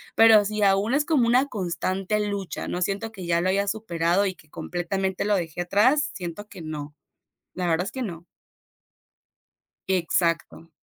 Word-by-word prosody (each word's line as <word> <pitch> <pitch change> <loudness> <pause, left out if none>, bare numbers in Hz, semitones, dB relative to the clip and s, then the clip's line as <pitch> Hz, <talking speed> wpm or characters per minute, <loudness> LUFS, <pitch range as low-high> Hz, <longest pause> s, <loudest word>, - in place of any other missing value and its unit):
pero 225 -2 +7
sí, 210 0 -2
aún 200 +6 +3
es 295 +1 +2
como 280 -8 +3
una 250 +3 +4
constante 190 - -2
lucha, 200 -3 -3
no 180 - -3
siento 200 +4 -2
que 185 -5 -8
ya 170 0 +2
lo 185 - +1
haya 200 +1 +1
superado 190 -3 +1
y 190 - -1
que 155 -4 -22
completamente 190 +3 -2
lo 210 0 +2
dejé 175 -2 -3
atrás, 245 +12 +3
siento 180 +3 -6
que 175 - -10
no, 150 -1 -6 0.6
la 180 -1 -2
verdad 170 +1 +1
es - - -5
que 260 -1 -4
no. 170 -5 -6 1.7
Exacto. 170 -2 0
190 Hz, 165 wpm, -25 LUFS, 175-210 Hz, 1.7 s, pero